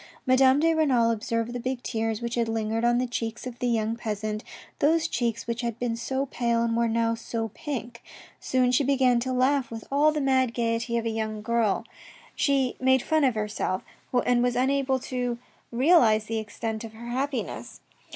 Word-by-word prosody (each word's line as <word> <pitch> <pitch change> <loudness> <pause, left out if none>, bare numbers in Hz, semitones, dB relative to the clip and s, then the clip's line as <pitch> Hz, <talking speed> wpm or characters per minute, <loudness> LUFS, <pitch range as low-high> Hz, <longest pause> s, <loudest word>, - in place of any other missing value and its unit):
Madame 260 +1 +5
de 330 +2 +3
Renal 260 -8 +3
observed 230 +1 -2
the 245 - -3
big 255 0 -3
tears 225 0 -2
which 235 0 -3
had 235 -2 0
lingered 225 0 -1
on 240 0 +3
the 250 - +1
cheeks 235 -1 -4
of 245 -1 -7
the 250 - 0
young 225 -1 0
peasant, 215 -2 -4 0.4
those 320 +3 +3
cheeks 235 -6 -2
which 235 0 -3
had 235 -2 -3
been 240 -1 -1
so 265 +4 -2
pale 235 -3 0
and 230 -1 0
were 235 0 +2
now 230 0 +1
so 230 0 -4
pink. 245 -5 -6 0.4
Soon 255 -1 +1
she 250 +3 +3
began 260 -3 +3
to 260 +2 -2
laugh 255 0 +2
with 225 -1 -7
all 295 +2 +4
the 305 - -2
mad 260 -3 +2
gaiety 235 0 0
of 230 - -2
a 230 - 0
young 220 -1 -3
girl, 230 -2 +1 0.5
she 270 -3 +1
made 260 -1 +3
fun 315 -1 +2
of 255 -4 +3
herself, 210 -3 -2 0.4
and 245 -1 +3
was 245 0 +1
unable 265 +1 +1
to 250 -2 -3 0.3
realise 240 -5 +4
the 225 +1 -3
extent 220 +1 -5
of 225 -1 -8
her 235 +2 -9
happiness. 270 +3 -3
240 Hz, 190 wpm, -26 LUFS, 230-260 Hz, 0.5 s, Madame